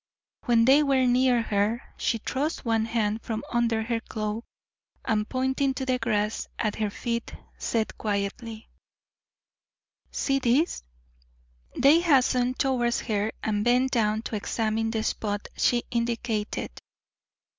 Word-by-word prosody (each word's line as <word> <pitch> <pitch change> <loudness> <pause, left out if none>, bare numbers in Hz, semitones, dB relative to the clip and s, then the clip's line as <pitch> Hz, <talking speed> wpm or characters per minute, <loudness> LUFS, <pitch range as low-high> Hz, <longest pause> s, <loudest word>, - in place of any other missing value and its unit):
When 235 -3 +4
they 275 +4 +6
were 270 -3 +3
near 250 -1 +3
her 210 +2 0
she 230 - 0
thrust 280 +7 -3
one 225 -1 +1
hand 225 -1 -1
from 220 -1 -4
under 230 -2 +1
her 230 0 -1
cloak, 215 0 -4 0.6
and 210 -1 0
pointing 265 +1 0
to 265 - -3
the 255 -1 0
grass 215 -2 -1
at 215 -2 -1
her 215 -1 0
feet, 235 +2 -4 0.2
said 225 -2 -1
quietly: 215 +2 -3 1.4
"See 275 -1 0
this?" 265 +7 +1 0.9
They 285 +5 +6
hastened 255 -6 +2
towards 245 -3 +1
her 210 0 -1
and 210 -1 0
bent 250 +3 +3
down 215 -2 +1
to 225 - -4
examine 220 +1 -1
the 220 -1 -1
spot 205 -2 -2
she 240 -1 +2
indicated. 235 - -2
230 Hz, 130 wpm, -26 LUFS, 220-255 Hz, 1.4 s, they